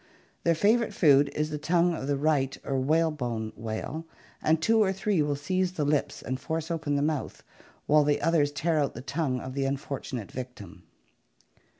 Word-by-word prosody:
Their 170 -1 +3
favorite 215 +4 +2
food 145 -3 +5
is 150 0 -1
the 150 - -3
tongue 170 +3 +2
of 135 -4 -4
the 145 -1 +1
right 140 -2 +1
or 135 -1 0
whalebone 130 -7 0
whale, 115 +9 -5 0.3
and 160 +1 +3
two 225 +7 +3
or 195 -2 +3
three 195 -2 0
will 145 -1 0
seize 185 +6 -1
the 155 -5 -1
lips 145 0 0
and 130 0 -3
force 160 +2 -3
open 155 -3 -1
the 140 - +1
mouth, 150 -2 -2 0.4
while 150 0 +5
the 145 0 +2
others 150 -2 +2
tear 155 +3 0
out 145 - 0
the - - -6
tongue 140 -2 -1
of 130 0 -7
the 135 0 -1
unfortunate 135 -5 -4
victim. 125 -7 -8
150 Hz, 185 wpm, -28 LUFS, 135-165 Hz, 0.4 s, food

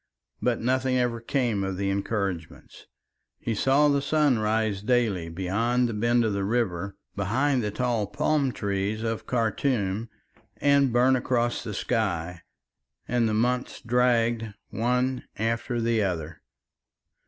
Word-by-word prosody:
But 120 -2 +1
nothing 130 +1 +1
ever 120 -2 0
came 115 -5 0
of 95 -1 -3
the 100 0 0
encouragements. 100 -4 -4 0.5
He 115 - -2
saw 135 +7 +3
the 140 -1 +2
sun 145 -3 +2
rise 110 -2 0
daily 105 -7 +1
beyond 110 +8 0
the 115 - -3
bend 120 +2 +2
of 110 - 0
the 100 0 -1
river 100 -4 -1 0.2
behind 125 +7 +1
the 105 - -1
tall 115 -1 -1
palm 145 +3 +1
trees 100 0 -2
of 115 -1 -3
Khartum 115 -3 0 0.5
and 140 -2 +3
burn 125 +2 +4
across 120 -1 0
the 105 - -5
sky, 90 -8 -1 0.7
and 120 -2 +1
the 110 - 0
months 125 +3 0
dragged 115 -2 +1 0.2
one 125 +2 0
after 115 +2 -1
the 115 -1 +1
other. 85 -5 -3
115 Hz, 135 wpm, -26 LUFS, 100-125 Hz, 0.7 s, burn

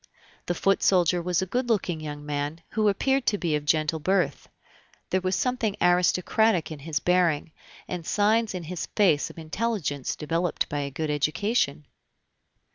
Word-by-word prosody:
The 175 - 0
foot 195 +2 +2
soldier 180 -2 +3
was 180 +1 0
a - - -2
good 245 +6 -2
looking 185 -7 0
young 145 -1 -7
man, 145 +2 -3
who 215 -1 +2
appeared 265 +6 +1
to 205 - +3
be 165 -5 0
of 150 -1 -3
gentle 155 +1 +1
birth. 190 +4 0 0.6
There 185 - +2
was 185 0 0
something 240 -4 0
aristocratic 180 +2 +2
in 155 - -7
his 150 +1 -2
bearing, 175 -4 +1 0.4
and 180 -2 -4
signs 210 +3 +1
in 180 - -4
his 170 +2 -5
face 180 -9 +3
of - - -14
intelligence 165 - -2
developed 165 +2 -1
by 145 - -2
a 140 -1 -2
good 150 +3 -3
education. 150 - 0
175 Hz, 165 wpm, -26 LUFS, 155-200 Hz, 0.6 s, soldier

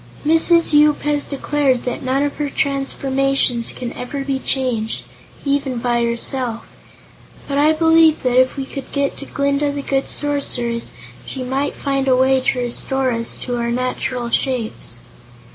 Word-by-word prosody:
"Mrs. 325 +1 +4
Yoop 300 0 +4
has 295 -1 0
declared 280 -2 0
that 250 - -3
none 265 +2 0
of 290 - -2
her 295 -1 -2
transformations 275 -3 +1
can 245 -1 -6
ever 275 +2 -5
be 270 -1 -1
changed, 245 -5 -1 0.4
even 275 -2 0
by 235 0 0
herself, 235 0 0 0.8
but 280 0 0
I 300 +2 +5
believe 325 0 +4
that 255 0 +4
if 255 +1 -1
we 270 - -3
could 275 -1 -8
get 280 -1 0
to 280 - -8
Glinda 280 +1 0
the 285 0 -5
Good 270 -1 -1
Sorceress, 245 -5 -1 0.3
she 265 - -6
might 265 +3 -2
find 275 -1 -1
a 260 - +5
way 260 +1 +3
to 255 0 0
restore 255 +2 0
us 230 0 -3
to 245 -1 -2
our 235 0 -1
natural 250 0 -2
shapes. 250 -5 -2
270 Hz, 160 wpm, -19 LUFS, 250-285 Hz, 0.8 s, I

